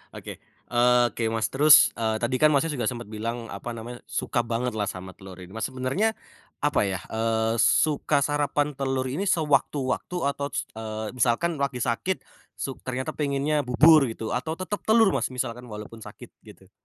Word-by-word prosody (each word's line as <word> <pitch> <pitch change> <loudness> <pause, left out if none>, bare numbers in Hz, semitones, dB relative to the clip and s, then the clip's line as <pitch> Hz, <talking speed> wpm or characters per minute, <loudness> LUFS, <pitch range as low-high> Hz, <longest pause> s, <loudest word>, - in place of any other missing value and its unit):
Oke, - - -8 0.3
oke 120 -1 +3
Mas, 110 0 -1
terus, 150 +3 +7
eee, 110 -1 0
tadi 120 +3 -1
kan 155 - +6
Masnya, 150 +2 +2
juga 125 -7 -2
sempet 120 -3 -4
bilang 115 +2 -5
apa 120 -1 -6
namanya, 120 +2 -8
suka 120 - -2
banget 120 +1 -1
lah 105 -2 -2
sama 95 -1 -6
telur 95 0 -12
ini 90 - -13
nah 110 - -7
sebenernya, 135 - -1 0.5
apa 145 -1 +2
ya, 95 -2 -2
eee, 110 0 0
suka 145 +4 +3
sarapan 145 0 0
telur 135 -2 -2
ini 190 +9 -2
sewaktu-waktu 145 -2 0 0.2
atau 140 0 -4
s - - -3 0.2
eee, 110 -1 -5
misalkan 130 +7 0
lagi 135 -3 -1
sakit, 130 +10 -1 0.3
suk 135 - -5
ternyata 130 0 -2
pengennya 145 0 -1
bubur 150 +3 +6
gitu 115 -1 -5
atau 130 +6 -2
tetep 185 +3 -4
telur 220 -3 +5
Mas, - - 0
misalkan 125 -1 -5
walaupun 105 +1 -9
sakit 110 - -12
gitu? - - -17
125 Hz, 170 wpm, -25 LUFS, 115-145 Hz, 0.5 s, terus